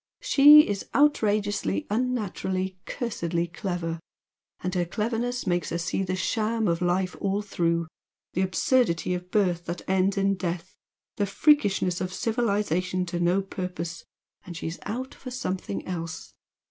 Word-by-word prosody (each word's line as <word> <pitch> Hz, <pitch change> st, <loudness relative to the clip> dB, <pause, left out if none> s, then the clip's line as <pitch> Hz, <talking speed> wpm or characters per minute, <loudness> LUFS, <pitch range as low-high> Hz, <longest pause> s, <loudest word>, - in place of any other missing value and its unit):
SHE 295 Hz, +2 st, +8 dB
is 200 Hz, -1 st, -3 dB
outrageously, 205 Hz, -, +2 dB
unnaturally, 200 Hz, -6 st, -1 dB
cursedly 170 Hz, -9 st, -2 dB
clever! 170 Hz, -1 st, -4 dB, 0.6 s
And 180 Hz, 0 st, -2 dB
her 180 Hz, -2 st, +1 dB
cleverness 230 Hz, +7 st, -2 dB
makes 175 Hz, -3 st, 0 dB
her 170 Hz, -, -1 dB
see 170 Hz, +3 st, -1 dB
the 185 Hz, -1 st, -1 dB
sham 220 Hz, +3 st, 0 dB
of 170 Hz, 0 st, 0 dB
life 180 Hz, +1 st, +1 dB
all 200 Hz, +1 st, 0 dB
through; 170 Hz, -4 st, 0 dB, 0.5 s
the 185 Hz, -, 0 dB
absurdity 185 Hz, 0 st, +2 dB
of 180 Hz, 0 st, -5 dB
birth 180 Hz, -4 st, +1 dB
that 170 Hz, +1 st, -5 dB
ends 190 Hz, +1 st, +2 dB
in 195 Hz, 0 st, +3 dB
death 175 Hz, 0 st, -4 dB, 0.4 s
the 205 Hz, -, +1 dB
freakishness 200 Hz, -, +3 dB
of 185 Hz, -, -2 dB
civilisation 200 Hz, -6 st, 0 dB
to 175 Hz, 0 st, -3 dB
no 175 Hz, +3 st, +2 dB
purpose 180 Hz, -3 st, -5 dB, 0.4 s
and 175 Hz, -3 st, -8 dB
she's 165 Hz, +1 st, -5 dB
out 255 Hz, +6 st, -4 dB
for 255 Hz, -, -9 dB
something 185 Hz, -, -4 dB
else. 165 Hz, -3 st, -5 dB
185 Hz, 140 wpm, -26 LUFS, 175-210 Hz, 0.6 s, SHE